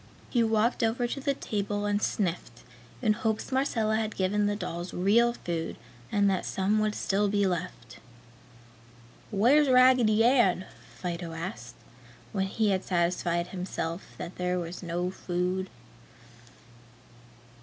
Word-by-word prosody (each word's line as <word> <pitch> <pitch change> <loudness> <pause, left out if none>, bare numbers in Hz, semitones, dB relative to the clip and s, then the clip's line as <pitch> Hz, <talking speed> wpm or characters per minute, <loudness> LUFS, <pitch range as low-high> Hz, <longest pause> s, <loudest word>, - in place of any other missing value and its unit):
He 240 - +3
walked 225 +2 +1
over 230 +2 +1
to 240 +3 -3
the 275 0 0
table 205 -2 -2
and 205 0 0
sniffed, 170 - -2 0.4
in 215 -3 +4
hopes 220 +2 -2
Marcella 230 -5 +1
had 220 -1 -2
given 205 +2 +1
the 205 - 0
dolls 175 -3 -5
real 225 +6 +3
food 170 -7 -4 0.4
and 205 -1 +3
that 190 -2 +1
some 200 +3 0
would 215 0 0
still 205 +1 +1
be 205 0 +2
left. 165 -10 -4 1.3
"Where's 260 +8 +4
Raggedy 250 -4 +5
Ann?" 230 -7 +3 0.3
Fido 170 -2 -5
asked, 160 -9 -6 0.6
when 195 0 -1
he 210 +1 +1
had 190 -1 0
satisfied 175 -1 0
himself 180 -2 -5
that 175 - -7
there 180 0 0
was 175 0 -5
no 175 +1 -2
food. 185 +1 -2
195 Hz, 135 wpm, -28 LUFS, 180-220 Hz, 1.3 s, Raggedy